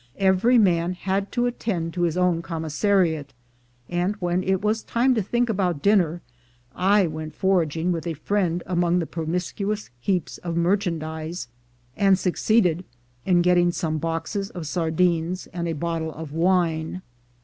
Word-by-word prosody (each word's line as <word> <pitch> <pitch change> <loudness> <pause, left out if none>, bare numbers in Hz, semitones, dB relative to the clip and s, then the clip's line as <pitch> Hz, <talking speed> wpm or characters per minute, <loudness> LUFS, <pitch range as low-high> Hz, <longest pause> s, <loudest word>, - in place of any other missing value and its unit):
Every 195 +6 +4
man 175 -4 +3
had 195 +2 -2
to 240 0 +1
attend 190 -9 -2
to 180 - -3
his 170 -1 +1
own 180 -2 +2
commissariat; 160 -3 0 0.5
and 180 +4 -1
when 180 -2 -1
it 190 0 +1
was 215 +1 +1
time 250 +3 +2
to 225 - +1
think 240 +5 0
about 185 -9 -1
dinner, 175 -5 +3 0.5
I 195 +2 +4
went 155 -1 -5
foraging 175 -3 +1
with 165 -2 -3
a 165 - -2
friend 175 +1 -1
among 175 -1 +1
the 170 - 0
promiscuous 180 +6 -3
heaps 180 +4 -1
of 170 -1 -4
merchandise, 165 - -1 0.5
and 195 -1 +4
succeeded 180 -1 +2 0.4
in 175 -2 +4
getting 175 0 +4
some 155 -2 -2
boxes 165 +5 -3
of 175 -3 -7
sardines 170 +2 0
and 170 -1 -3
a 165 - -1
bottle 160 +1 -2
of 155 -1 -8
wine. 170 0 +1
175 Hz, 150 wpm, -24 LUFS, 165-195 Hz, 0.5 s, Every